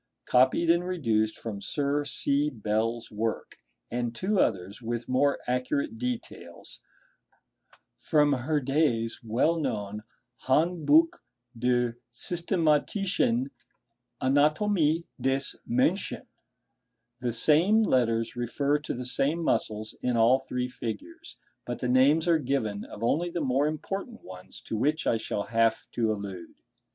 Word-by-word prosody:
1) 125 - +6
copied 165 +6 +3
and 170 +1 +1
reduced 115 -12 0
from 105 -3 -6
Sir 145 +3 -1
C. 145 +1 0
Bell's 115 0 -2
work, 110 +1 -3 0.3
and 120 -1 -2
two 195 - 0
others, 95 - 0
with 120 0 -4
more 140 +2 +2
accurate 225 - -1
details 250 -2 -6 1.2
(figs. - - -18
2 160 - +2
and 150 0 +6
3), 130 - -1
from 120 - -7
Herde's 135 -6 +1
well 125 +9 +1
known 105 -7 -3 0.5
'Handbuch 160 +2 +3 0.4
der 120 0 0
Systematischen 165 - 0 0.7
Anatomie 155 +4 +2 0.2
des 135 +1 +1 0.2
Menschen.' 145 +11 0 0.9
The 125 -1 -1
same 165 - +4
letters 115 - +1
refer 140 +5 0
to 150 - -5
the 125 +1 -5
same 145 +6 +1
muscles 110 -7 -1
in 125 -1 0
all 120 +4 +5
three 125 -1 -3
figures, 320 - -7 0.3
but 120 - -4
the 125 - -3
names 140 +6 +4
are 165 -2 +4
given 120 -7 -2
of 105 - -9
only 170 +9 +1
the 175 0 -3
more 140 0 +1
important 195 +9 -5
ones 90 0 -10
to - - -5
which 150 +8 0
I 115 - +2
shall 105 -2 -3
have 115 0 +1
to 115 -2 0
allude. 100 -5 -6
130 Hz, 135 wpm, -27 LUFS, 115-160 Hz, 1.2 s, 1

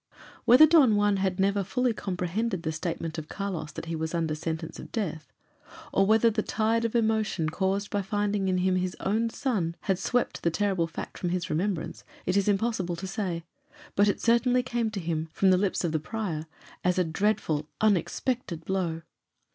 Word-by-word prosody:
Whether 250 +6 +9
Don 295 -9 +6
Juan 205 -1 +3
had 190 -1 -1
never 200 +1 +2
fully 250 +5 0
comprehended 190 0 -2
the 160 - -1
statement 165 0 -3
of 155 - -9
Carlos 180 -7 -4
that - - -6
he 165 0 -3
was 160 +1 -3
under 165 -2 0
sentence 160 +1 -4
of - - -10
death, 165 - -3 0.6
or 195 0 +3
whether 225 +2 +5
the 215 0 0
tide 225 +2 +1
of 230 - -2
emotion 220 -7 +1
caused 195 +4 -1
by 205 - 0
finding 205 0 -1
in 185 - +2
him 185 0 +2
his 180 0 -2
own 225 +4 0
son 210 - -1
had 190 -2 0
swept 245 +5 0
the 170 - +2
terrible 190 -1 0
fact 165 - -7
from 175 - -1
his 180 -1 -2
remembrance, 175 +1 -2 0.2
it 185 - 0
is 200 0 +2
impossible 195 -4 0
to 190 - -6
say; 185 -3 -3 0.5
but 205 +1 +4
it 200 - +1
certainly 245 +2 +3
came 240 -3 -1
to 215 -2 -4
him, 160 -2 -2
from 190 -1 +4
the - - +6
lips 195 -1 0
of 170 - 0
the 155 - 0
prior, 165 -3 -4 0.4
as 180 0 +2
a 180 - +4
dreadful, 160 -4 0
unexpected 205 - 0
blow. 175 -4 -1
195 Hz, 190 wpm, -28 LUFS, 170-215 Hz, 0.6 s, Whether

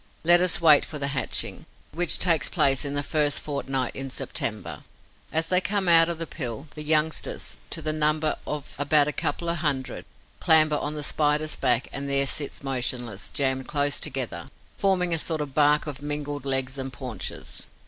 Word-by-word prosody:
Let 175 +1 +6
us 180 -2 +1
wait 155 -4 +6
for 150 - -6
the 140 -1 -1
hatching, 140 -2 -3 0.2
which 175 +2 +2
takes 165 -6 +3
place 135 0 +3
in 140 0 -3
the 145 - -1
first 150 -1 0
fortnight 135 -3 -3
in 135 0 -5
September. - - -3 0.5
As 160 +2 +1
they 180 +2 +3
come 195 -1 0
out 165 0 +6
of 170 - -2
the 165 - -4
pill, 135 -2 -6
the 150 - -7
youngsters, 155 +1 +1
to 165 - -5
the 155 0 0
number 155 0 +1
of 150 -2 -5
about 145 0 +4
a 150 - -1
couple 170 - -2
of 170 0 0
hundred, 140 -5 -3 0.3
clamber 155 -2 +4
on 150 +1 -4
the 150 - -5
Spider's 150 +1 0
back 125 -2 +1
and 140 0 -4
there 140 0 +4
sit 145 0 -4
motionless, 125 -5 -2
jammed 130 -1 0
close 145 -1 0
together, 115 - -2 0.3
forming 180 -3 +1
a 165 - +1
sort 160 0 -1
of 145 -2 -5
bark 150 +1 +3
of 145 -3 -7
mingled 145 -1 -4
legs 135 0 +1
and 135 0 -4
paunches. 115 - -6
145 Hz, 185 wpm, -25 LUFS, 135-155 Hz, 0.5 s, Let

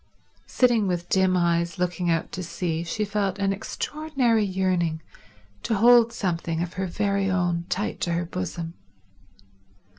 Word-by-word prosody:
Sitting 240 -5 +3
with 175 -1 -2
dim 190 -1 +3
eyes 170 0 +1
looking 180 -1 -1
out 165 -1 0
to 185 - -5
sea 170 -1 -3
she 210 +5 -2
felt 200 -2 -1
an 195 -1 +1
extraordinary 250 +1 -1
yearning 185 -4 0 0.6
to 225 - -1
hold 235 +2 +6
something 170 -6 -2
of 175 - -6
her 190 0 -2
very 200 +1 0
own 175 -2 0
tight 205 +3 -2
to 170 - 0
her 170 +1 -1
bosom. 170 -1 -5
185 Hz, 145 wpm, -25 LUFS, 170-205 Hz, 0.6 s, hold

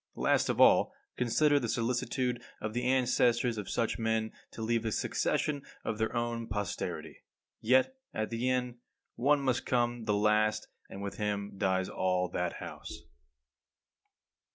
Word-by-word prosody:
Last - - +2
of - - 0
all, - - +6 0.2
consider 145 +4 +3
the 120 -4 -3
solicitude 120 +1 -1 0.2
of 110 - -4
the 120 +1 -1
ancestors 125 -2 +2
of 105 - -6
such 115 -1 -1
men 110 -1 0 0.2
to 110 - -7
leave 115 0 +1
a 110 - -1
succession 145 +6 0 0.2
of 110 -1 -2
their 110 +2 -1
own 120 -1 -2
posterity. 105 -3 -4 0.4
Yet, 130 - +3 0.2
at 110 +1 -3
the 120 +2 0
end, 125 -1 -1 0.4
one 140 +3 +3
must 130 -3 0
come 120 -2 0
the 105 -2 +2
last, 105 +1 +2 0.2
and 100 - -7
with 100 - -5
him 105 -1 -2
dies 95 -1 +1
all 90 -1 0
that 90 0 -2
house. - - -8
115 Hz, 150 wpm, -31 LUFS, 105-125 Hz, 0.4 s, all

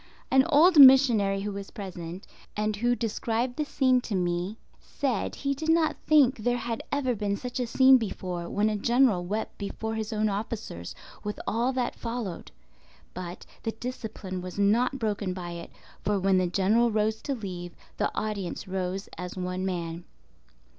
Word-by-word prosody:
An 265 +3 +5
old 320 +2 +6
missionary 240 -8 +7
who 205 +1 -3
was 200 0 -6
present, 180 -2 -7 0.3
and 215 0 0
who 240 +3 +2
described 235 +2 -2
the 305 - -1
scene 260 -3 +2
to 225 -4 -4
me, 180 +3 -1 0.2
said 260 -7 -2
he 280 -1 -1
did 315 +4 -4
not 325 -1 +3
think 280 -4 +5
there 245 +3 +1
had 230 -2 -3
ever 275 -3 +1
been 205 -2 -1
such 250 +2 -5
a 245 - -1
scene 260 +2 +6
before 180 -6 -4
when 205 +1 +1
a 215 - 0
general 235 -3 +3
wept 210 +5 -4
before 220 +2 -4
his 220 0 -3
own 215 0 +1
officers, 205 - -4 0.3
with 210 0 -4
all 235 +4 +1
that 250 -2 -1
followed. 230 -7 -5 0.6
But 180 -1 -7 0.2
the 225 - -3
discipline 220 -6 -6
was 180 +1 -8
not 225 +7 +2
broken 205 -5 -2
by 175 -2 -6
it; 170 0 -7 0.3
for 205 -1 +1
when 190 0 +3
the 180 - +1
General 205 +6 +3
rose 220 0 0
to 280 - -2
leave, 180 -6 -7 0.2
the - - +1
audience 205 -3 -3
rose 190 +1 -3
as 180 +1 -6
one 185 +1 -2
man. 170 -2 -4
215 Hz, 170 wpm, -27 LUFS, 185-245 Hz, 0.6 s, missionary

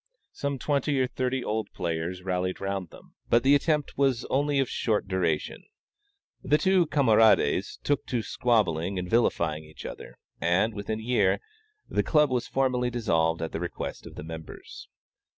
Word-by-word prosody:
Some 140 -1 -3
twenty 140 +1 0
or 130 - +3
thirty 130 0 -2
old 110 +1 -2
players 85 +2 -3
rallied 90 0 -2
round 95 -3 -3
them, - - -16 0.2
but 120 0 +4
the 135 +2 +5
attempt 150 -1 +1
was 135 -3 +2
only 145 +1 +1
of 135 -2 +2
short 110 -4 -1
duration. 90 -5 -1 0.8
The 150 +3 +3
two 185 -1 +3
camarades 110 - +3
took 145 -1 0
to 120 -3 -1
squabbling 100 -8 +1
and 90 0 -3
vilifying 85 -8 +1
each 75 0 -12
other; - - -8 0.2
and, 90 +7 +2
within 110 +1 -4
a - - -8
year, 100 -5 +2 0.5
the - - +1
Club 150 -3 +3
was 125 -2 0
formally 125 -2 +1
dissolved 80 -9 0
at 80 - -4
the - - -4
request 85 0 -5
of - - -12
the - - -7
members. 80 -1 -9
110 Hz, 165 wpm, -27 LUFS, 90-130 Hz, 0.8 s, the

